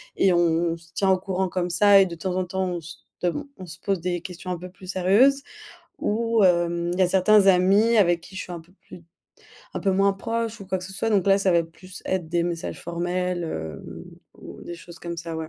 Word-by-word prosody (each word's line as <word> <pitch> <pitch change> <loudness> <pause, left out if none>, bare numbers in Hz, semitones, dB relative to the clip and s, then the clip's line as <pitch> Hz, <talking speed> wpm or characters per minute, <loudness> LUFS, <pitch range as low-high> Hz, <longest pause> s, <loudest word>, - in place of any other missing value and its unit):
et 195 - +3
on 170 -1 +2
se 170 +1 -21
tient 195 -1 +1
au 190 - +4
courant 190 0 -2
comme 180 -1 -2
ça. 200 +2 +6
Et - - +4
de 175 - -6
temps 180 +2 -4
en 185 -1 0
temps, 190 +1 -2
on 175 - -3
se 165 +2 -11 0.3
dem 180 +12 -1
on 185 - -9
se 165 - -11
pose 195 -3 -1
des 175 -1 -2
questions 180 0 -7
un 175 - -2
peu 180 +1 -8
plus 185 +1 -15
sérieuses. 200 +10 +3 0.6
Ou, 230 0 +1
hem, 170 -1 +2
il 180 - -4
y - - +4
a 180 - +3
certains 195 +2 +4
amis 195 +5 +4
avec 175 -4 +3
qui 190 +2 -13
je - - -3
suis 180 - -9
un 170 - -6
peu 170 +3 -22
plus 175 - -12 0.7
un - - -3
peu 195 - +1
moins 195 +1 +3
proche 230 +2 -3
ou 195 - -9
quoi 190 0 -1
que 180 - -8
ce 195 - -9
soit. 225 +4 -1
Donc 200 -3 +2
là, 195 0 +5
ça 195 -2 +2
va 170 -1 +4
plus 180 +3 -13
être 185 -3 -1
des 170 +1 0
messages 170 -1 -4
formels, 175 +1 -2
heu, 80 - -6 0.5
ou - - -11
des - - -8
choses 170 0 -13
comme 170 -1 -6
ça, 165 -1 -5
ouais. 160 -1 -5
180 Hz, 250 wpm, -24 LUFS, 170-195 Hz, 0.7 s, ça